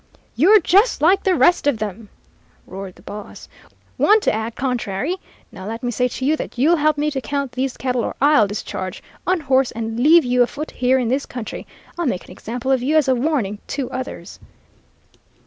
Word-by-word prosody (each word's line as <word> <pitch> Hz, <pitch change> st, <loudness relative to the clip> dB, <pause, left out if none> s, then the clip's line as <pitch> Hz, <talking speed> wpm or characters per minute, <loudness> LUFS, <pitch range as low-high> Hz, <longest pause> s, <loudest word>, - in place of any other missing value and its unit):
"'You're 375 Hz, -, +6 dB
just 400 Hz, +6 st, +3 dB
like 370 Hz, +5 st, +5 dB
the 375 Hz, -2 st, +2 dB
rest 350 Hz, -3 st, +3 dB
of 285 Hz, -5 st, +2 dB
them!' 210 Hz, 0 st, -6 dB, 0.6 s
roared 190 Hz, 0 st, -8 dB
the -, -, -19 dB
boss. 210 Hz, 0 st, -9 dB, 0.5 s
'Want 430 Hz, 0 st, +5 dB
to -, -, +2 dB
act 220 Hz, +1 st, -3 dB
contrary! 255 Hz, -, -2 dB, 0.3 s
Now 190 Hz, 0 st, -9 dB
let 225 Hz, +2 st, -6 dB
me 245 Hz, -, -1 dB
say 250 Hz, +2 st, +1 dB
to 260 Hz, +1 st, -5 dB
you 305 Hz, +3 st, +3 dB
that -, -, -7 dB
you'll 315 Hz, +7 st, +4 dB
help 305 Hz, 0 st, +2 dB
me 300 Hz, +1 st, 0 dB
to 270 Hz, -2 st, -3 dB
count 280 Hz, -1 st, -3 dB
these 260 Hz, +1 st, -3 dB
cattle 250 Hz, -2 st, -1 dB
or -, -, -4 dB
I'll 280 Hz, -7 st, +5 dB
discharge, 185 Hz, -2 st, -5 dB, 0.2 s
unhorse, 270 Hz, -8 st, +2 dB
and 225 Hz, 0 st, -4 dB
leave 315 Hz, +5 st, +6 dB
you 250 Hz, 0 st, +2 dB
afoot 285 Hz, +5 st, -1 dB
here 255 Hz, +1 st, +2 dB
in 245 Hz, -3 st, 0 dB
this 270 Hz, +3 st, -1 dB
country! 245 Hz, -3 st, -7 dB, 0.3 s
I'll 340 Hz, -, 0 dB
make 185 Hz, -8 st, -2 dB
an -, -, -14 dB
example 245 Hz, +4 st, -4 dB
of 260 Hz, -2 st, +2 dB
you 295 Hz, +5 st, +2 dB
as 300 Hz, -3 st, +3 dB
a 260 Hz, -, +4 dB
warning 245 Hz, -6 st, -1 dB
to 275 Hz, -2 st, -4 dB
others.' 255 Hz, 0 st, -7 dB
260 Hz, 200 wpm, -20 LUFS, 230-300 Hz, 0.6 s, You're